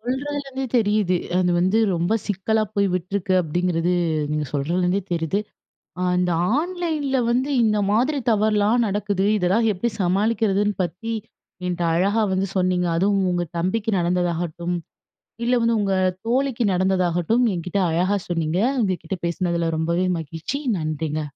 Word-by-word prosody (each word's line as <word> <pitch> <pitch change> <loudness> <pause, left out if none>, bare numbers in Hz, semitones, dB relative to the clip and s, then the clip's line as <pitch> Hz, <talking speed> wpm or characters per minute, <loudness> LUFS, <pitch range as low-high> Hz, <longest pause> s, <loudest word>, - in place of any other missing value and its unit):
சொல்றதுலருந்தே 270 +2 -3
தெரியுது. 210 -5 +2 0.2
அது 180 -1 +2
வந்து 190 +5 +2 0.2
ரொம்ப 175 +6 +1
சிக்கலா 215 +2 0
போய் 200 -1 +2
விட்ருக்கு. 185 +1 -1
அப்டிங்கிறது, 175 +2 0 0.4
நீங்க 150 0 -1
சொல்றதிலருந்தே 180 +7 0
தெரியுது. 170 +4 0 0.8
இந்த 180 -1 +1 0.3
ஆன்லைன்ல 315 -5 -1
வந்து 255 +4 +1
இந்த 215 -1 +2
மாதிரி 260 +8 +2
தவறுலாம் 215 +2 +2
நடக்குது. 200 -1 -1
இதெல்லாம் 205 +5 +2
எப்பிடி 210 +5 -1
சமாளிக்கிறதுன்னு 205 +2 +1
பத்தி 180 +7 -4 0.5
என்ட்ட 175 -1 -2
அழகா 200 +6 +2
வந்து 190 +1 0
சொன்னீங்க. 180 -1 +1
அதுவும் 195 +2 +2
உங்க 175 0 0
தம்பிக்கு 205 +6 0
நடந்ததாகட்டும், 175 -1 -1 0.7
இல்ல 250 - +3
வந்து, 230 0 +2
உங்க 195 -1 +1 0.3
தோழிக்கு 255 -1 +1
நடந்ததாகட்டும், 185 +4 +1
என்கிட்ட 180 +2 -2
அழகா 180 +5 +1
சொன்னீங்க. 165 0 0 0.2
உங்க 190 -3 +1
கிட்ட 180 +3 -4
பேசுனதில 170 -1 -1
ரொம்பவே 170 +3 0
மகிழ்ச்சி. 165 - -5 0.2
நன்றிங்க. 155 0 -2
190 Hz, 125 wpm, -22 LUFS, 175-220 Hz, 0.8 s, இல்ல